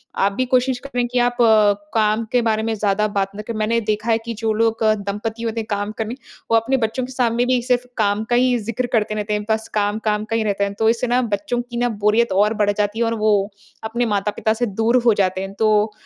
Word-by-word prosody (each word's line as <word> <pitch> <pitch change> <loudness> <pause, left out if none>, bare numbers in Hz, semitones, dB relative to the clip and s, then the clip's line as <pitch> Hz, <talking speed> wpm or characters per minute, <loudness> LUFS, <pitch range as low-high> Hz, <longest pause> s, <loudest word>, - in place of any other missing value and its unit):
आप 200 - +2
भी 255 +5 -1
कोशिश 255 0 +2
करें 245 -3 -1
कि 245 +1 -1
आप 245 0 +1 0.6
काम 215 0 +1
के 245 - +3
बारे 220 0 0
में 225 0 -1
ज़्यादा 210 0 +1
बात 195 0 0
ना 210 - -5
क - - -5
मैंने 220 +2 +1
देखा 215 +2 -1
है 225 - +4
कि 235 - -3
जो 220 -1 +2
लोग 225 +1 +1
दंपति 215 +2 -1
होते 230 0 -2
हैं 220 - -5
काम 205 0 -2
करने, 225 +2 -3 0.4
वो 230 - +6
अपने 255 +4 0
बच्चों 230 +1 -1
के 260 - -10
सामने 240 -1 +1
भी 250 -1 +2
सिर्फ़ 250 0 0
काम 210 0 +1
का 240 - +2
ही 250 0 +3
ज़िक्र 230 +3 -3
करते 215 -2 +1
रहते 210 0 -2
हैं, 210 0 -1
बस 220 0 0
काम-काम 210 0 0
का 225 - 0
ही 225 - +1
रहता 200 -1 0
है। 200 0 -2
तो 220 0 +4
इससे 235 +2 0
ना 245 +1 +2
बच्चों 205 +5 -1
की 240 - -5
ना 245 0 +1
बोरियत 215 +2 +1
और 205 +3 +3
बढ़ 210 -2 +1
जाती 210 +2 -2
है 235 - +2
और 230 - 0
वो 215 0 +2 0.5
अपने 235 +2 -1
माता-पिता 210 0 0
से 235 +2 -1
दूर 225 +4 +1
हो 230 - +6
जाते 185 0 0
हैं। 195 0 -6
तो 215 -1 +3
220 Hz, 245 wpm, -20 LUFS, 210-235 Hz, 0.6 s, वो